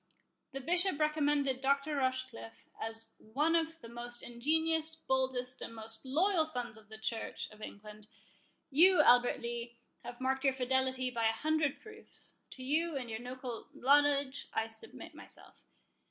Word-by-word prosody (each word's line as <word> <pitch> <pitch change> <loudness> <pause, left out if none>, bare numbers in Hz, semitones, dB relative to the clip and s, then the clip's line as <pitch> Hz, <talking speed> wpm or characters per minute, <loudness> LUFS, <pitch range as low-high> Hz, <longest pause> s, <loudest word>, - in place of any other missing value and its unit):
The 270 - -5
Bishop 355 +2 +1
recommended 295 -3 +2
Dr. 280 +2 +1
Rochecliffe 260 -3 -2
as 225 0 -4
one 295 +9 +1
of 325 0 0
the - - -9
most 240 +1 -5
ingenious, 320 +6 +1
boldest, 260 -4 -1
and 230 - -6
most 220 0 -5
loyal 325 +4 +3
sons 245 -6 -3
of 215 -1 -17
the 220 - -9
Church 220 +1 -2
of 215 0 -15
England; 210 0 -7 0.6
you, 335 +3 +7
Albert 245 -2 +5
Lee, 235 0 -5 0.3
have 245 0 -8
marked 265 +1 0
your 270 -1 +4
fidelity 260 0 +1
by 230 -2 +1
a - - 0
hundred 310 +2 +1
proofs. 435 0 -11 0.2
To 260 - -9
you 315 +4 +1
and 245 -3 -5
your 220 - -3
local 250 -1 -6
knowledge 285 0 +3
I 225 - +2
submit 225 0 -6
myself. - - -10
260 Hz, 155 wpm, -34 LUFS, 235-300 Hz, 0.6 s, you